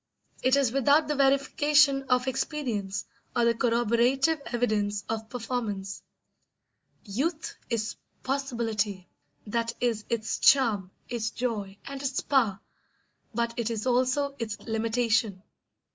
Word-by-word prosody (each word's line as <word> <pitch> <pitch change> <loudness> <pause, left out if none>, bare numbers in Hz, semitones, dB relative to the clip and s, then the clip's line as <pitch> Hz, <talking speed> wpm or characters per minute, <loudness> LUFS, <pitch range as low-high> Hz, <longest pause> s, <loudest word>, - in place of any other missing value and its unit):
It 255 +1 +4
is 275 -5 +2
without 285 +4 +4
the 300 - 0
verification 280 +1 +4
of 250 0 +2
experience 230 -8 -2 0.3
or 240 - +3
the 235 - +4
corroborative 240 +6 +2
evidence 210 - 0
of 220 0 -4
performance. 225 -5 -4 1.0
Youth 285 - -2
is 225 -2 -2 0.3
possibility; 225 -8 -2 0.4
that 230 +2 -2
is 230 -3 0
its 225 -2 -1
charm, 225 -9 +4 0.2
its 230 -2 -2
joy, 210 -6 -3
and 275 -1 -6
its 275 -1 -1
power; 230 -9 +2 0.8
but 235 0 0
it 235 -1 -1
is 225 -1 -3
also 255 +3 +1
its 220 -2 -4
limitation. 225 -3 0
235 Hz, 115 wpm, -28 LUFS, 220-270 Hz, 1.0 s, It